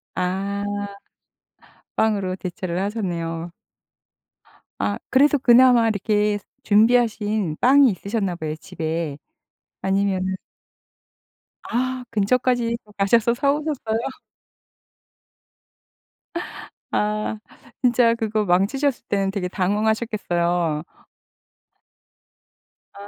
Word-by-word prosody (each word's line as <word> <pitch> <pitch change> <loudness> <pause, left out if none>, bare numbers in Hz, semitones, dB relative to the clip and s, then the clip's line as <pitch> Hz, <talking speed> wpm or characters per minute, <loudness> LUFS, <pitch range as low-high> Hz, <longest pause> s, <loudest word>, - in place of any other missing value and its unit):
아. 195 +2 -2 1.3
빵으로 200 -4 +1
대체를 180 -1 -4
하셨네요. 170 -5 -3 1.3
아 100 0 -1
그래서 290 +2 +4
그나마 245 -2 +6
이렇게 210 0 +1 0.3
준비하신 215 -5 +2
빵이 270 +1 +6
있으셨나 195 -1 -2
봐요 155 -2 -4
집에. 160 -2 -4 0.7
아니면은 190 -1 0 1.3
아 255 +1 -2
근처까지 235 +2 +1
또 210 - -19
가셔서 230 +4 +3
사오셨어요? 280 -4 0 2.9
아. 210 +1 -1 0.4
진짜 240 -2 +4
그거 220 -2 -1
망치셨을 240 +9 +1
때는 195 -1 0
되게 190 -3 -2
당황하셨겠어요. 180 -5 0 2.1
아. 200 0 -11
210 Hz, 190 characters per minute, -22 LUFS, 185-235 Hz, 2.9 s, 그나마